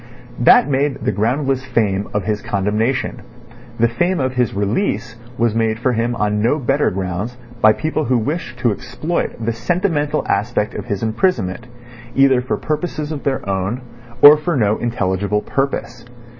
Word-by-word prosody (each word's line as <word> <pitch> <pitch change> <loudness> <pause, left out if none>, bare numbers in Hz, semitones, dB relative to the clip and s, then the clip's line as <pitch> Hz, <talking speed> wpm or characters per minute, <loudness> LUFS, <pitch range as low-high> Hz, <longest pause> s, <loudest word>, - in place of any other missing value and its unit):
That 120 +2 +6
made 140 0 -1
the - - +2
groundless 130 +6 0
fame 105 -6 0
of 105 -1 -1
his 105 +1 -2
condemnation; 105 +6 -1 0.6
the 115 - +5
fame 175 +10 0
of 130 -1 -1
his 125 -3 +1
release 115 - -1 0.2
was 115 -2 +2
made 110 -1 +1
for 125 +2 0
him 120 +1 0
on 105 -1 0
no 120 +7 +2
better 140 +1 +1
grounds 95 +5 -4 0.2
by 110 0 +7
people 155 +2 -2
who 125 +1 +2
wished 125 +2 -3
to 120 - +3
exploit 130 - -3
the 115 - 0
sentimental 150 - 0
aspect 105 +1 0
of - - -6
his 100 0 -3
imprisonment 115 - 0 0.5
either 135 -2 +4
for 130 - -2
purposes 155 -1 -3
of 150 -3 -4
their 135 -7 -2
own 100 +5 -2 0.4
or 145 +1 +11
for 165 +2 -2
no 105 -2 +2
intelligible 100 -3 -1
purpose. 135 -3 -2
120 Hz, 160 wpm, -19 LUFS, 105-140 Hz, 0.6 s, or